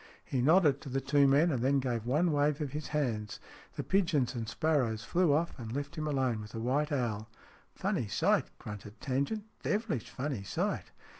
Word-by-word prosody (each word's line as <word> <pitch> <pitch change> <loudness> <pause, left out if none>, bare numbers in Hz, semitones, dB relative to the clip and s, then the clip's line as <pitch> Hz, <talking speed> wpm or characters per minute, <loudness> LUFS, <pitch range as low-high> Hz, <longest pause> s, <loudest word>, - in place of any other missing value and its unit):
He 130 - -1
nodded 150 -1 +4
to 140 - -8
the 135 +1 0
two 140 +1 +4
men, 150 +5 +4
and 130 -5 -1
then 135 +2 +3
gave 120 -3 -2
one 155 +7 +3
wave 145 0 +2
of 145 -4 -3
his 150 +2 -4
hands. 120 -9 -2 0.4
The - - -3
pigeons 165 -10 +2
and 115 -3 -4
sparrows 130 -10 +1
flew 175 -3 +2
off 160 +4 +1
and 115 -2 -6
left 145 +2 -4
him 155 -1 -3
alone 130 -6 0
with 105 0 -10
the 115 - -4
white 140 +6 0
owl. 115 -5 -1 0.2
" - - -27
Funny - - -1
sight! - - +2
" - - -39
grunted 105 +1 -9
Tangent. 140 +11 -1
" - - -40
Devilish 205 - -1
funny 130 -4 -3
sight 100 - -2
140 Hz, 205 wpm, -31 LUFS, 120-150 Hz, 0.4 s, nodded